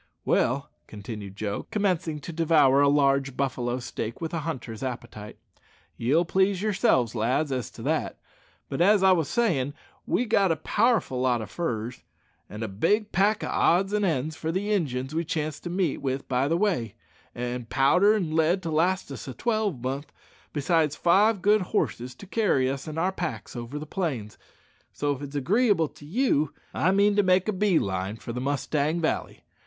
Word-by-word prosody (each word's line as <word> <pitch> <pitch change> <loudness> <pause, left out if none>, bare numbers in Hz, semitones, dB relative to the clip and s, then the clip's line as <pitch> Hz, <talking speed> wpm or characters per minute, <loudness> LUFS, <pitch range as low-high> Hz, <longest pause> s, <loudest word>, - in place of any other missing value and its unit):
"Well," 135 +3 +1 0.2
continued 105 -2 -8
Joe, 100 0 -4
commencing 180 -7 0
to 170 - -7
devour 150 -4 +4
a 145 - +5
large 140 -2 +2
buffalo 125 -2 -1
steak 120 -2 -5
with 165 -1 -4
a 165 - -1
hunter's 130 -8 -5
appetite, 120 -5 -6 0.6
"ye'll 150 +9 +2
please 190 +2 +2
yourselves, 190 - +2
lads, 125 +6 0
as 130 -2 -2
to - - -11
that; - - -1 0.5
but - - -3
as 200 +2 +5
I 190 - +6
wos 165 -5 +2
sayin', 145 - 0 0.3
we've 245 - +1
got 195 -4 +3
a - - +2
powerful 205 - +1
lot 125 -2 +2
o' 110 - -4
furs, 115 - -4 0.5
an' 105 +2 -6
a - - -2
big 205 - 0
pack 205 +3 +2
o' - - -2
odds 195 +4 +2
and 210 0 +1
ends 155 -4 0
for 160 0 -3
the 200 +4 -2
Injuns 135 -7 -1
we 165 +1 0
chance 155 -2 -3
to 175 - -7
meet 180 -4 0
with 135 0 -3
by 130 +1 +1
the 165 +3 +1
way, 170 - 0 0.4
an' 120 0 -4
powder 180 - +4
and 175 -7 -2
lead 165 +4 +2
to 165 - -3
last 175 +1 +1
us 135 - -7
a 130 - -6
twelvemonth, 150 - -2 0.4
besides 150 0 +1
five 200 +3 +3
good 210 +1 +4
horses 125 - -2
to 200 - -12
carry 190 - +1
us 135 +2 -3
an' 155 0 -6
our 180 +3 +1
packs 175 -7 -5
over 120 +4 -5
the 150 - -5
plains; 145 - -4 0.5
so 145 -1 -1
if 135 - -11
it's 145 0 -7
agreeable 190 - +2
to 145 - -15
you, 160 - +1 0.2
I 175 - +2
mean 200 +2 +3
to - - +6
make 185 0 +3
a 215 - +1
bee 195 -2 +2
line 95 -1 -2
for 115 +1 -7
the 125 - -4
Mustang 145 +3 0
Valley. 160 - -2
155 Hz, 185 wpm, -26 LUFS, 130-190 Hz, 0.6 s, I